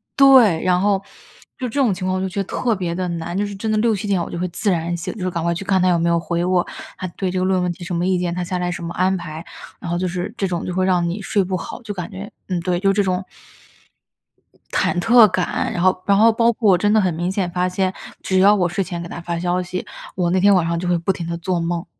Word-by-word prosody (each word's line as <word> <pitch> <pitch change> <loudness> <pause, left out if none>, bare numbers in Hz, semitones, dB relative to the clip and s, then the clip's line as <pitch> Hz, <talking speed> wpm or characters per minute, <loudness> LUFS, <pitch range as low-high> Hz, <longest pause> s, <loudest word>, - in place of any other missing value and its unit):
对， 255 -11 +6
然 180 -1 +3
后 195 0 +2 0.6
就 255 - -2
这 280 +5 0
种 245 -6 +3
情 185 0 -5
况 185 0 0
我 - - -2
就 190 - -2
觉 190 - -4
得 - - -1
特 235 +4 -1
别 180 -3 -3
地 185 0 -2
难， 170 0 -4
就 205 - +1
是 205 - -7
真 215 +3 -3
的 - - +2
6-7 215 -2 0
点 195 -3 +1
我 - - -7
就 - - -4
会 180 - -1
自 190 +4 -1
然 170 0 -1
醒， 170 - -4
就 215 - -8
是 185 0 -1
赶 170 -2 -3
快 170 - +1
去 195 +3 -6
看 190 -2 +2
他 185 - +3
有 175 - +3
没 170 +1 +1
有 170 0 +2
回 170 +1 -2
我， 180 -1 +2 0.3
他 185 - -4
对 190 -2 -1
这 185 - -1
个 185 - +1
论 185 -1 +1
文 180 - 0
提 175 - -11
什 175 0 -4
么 170 +1 0
意 185 -1 +1
见， 175 -1 -2
他 180 - -2
下 180 +1 -3
来 180 0 -1
什 170 - -6
么 170 0 -5
安 185 +1 +2
排。 155 -1 -7 0.4
然 175 - -6
后 175 - 0
就 185 +1 -1
是 180 +3 -3
这 195 - 0
种 175 -2 -3
就 180 - -3
会 185 0 +1
让 175 -2 +2
你 180 +5 -4
睡 200 +1 +1
不 185 0 -2
好， 175 +8 -7
就 215 - -6
感 180 +1 -6
觉 200 +2 -8 0.2
嗯， 180 -2 0
对， 175 0 0
就 195 +1 +2
这 205 - +2
种 185 0 -1 1.5
忐 175 - +1
忑 225 +4 +7
感， 185 -2 -1
然 175 - -2
后 185 0 +2
然 200 -1 +3
后 225 +2 +6
包 230 +1 +3
括 215 -3 +2
我 180 - +5
真 205 +4 +1
的 220 - +5
很 185 -4 +1
明 175 +3 -2
显 190 -2 -1
发 180 +1 0
现， 185 0 -1 0.3
只 190 -1 +1
要 200 +2 +6
我 180 -3 +2
睡 185 +3 -1
前 175 -2 -5
给 170 - -6
他 170 - -7
发 170 0 -3
消 180 +1 0
息， 180 0 -5 0.3
我 180 -2 0
那 185 - +2
天 200 +2 +5
晚 180 -3 +3
上 170 0 -1
就 180 - -3
会 175 -1 +2
不 170 +3 0
停 170 - -6
地 170 0 -3
做 175 +1 -1
梦。 170 +1 -2
185 Hz, 320 characters per minute, -20 LUFS, 175-195 Hz, 1.5 s, 忑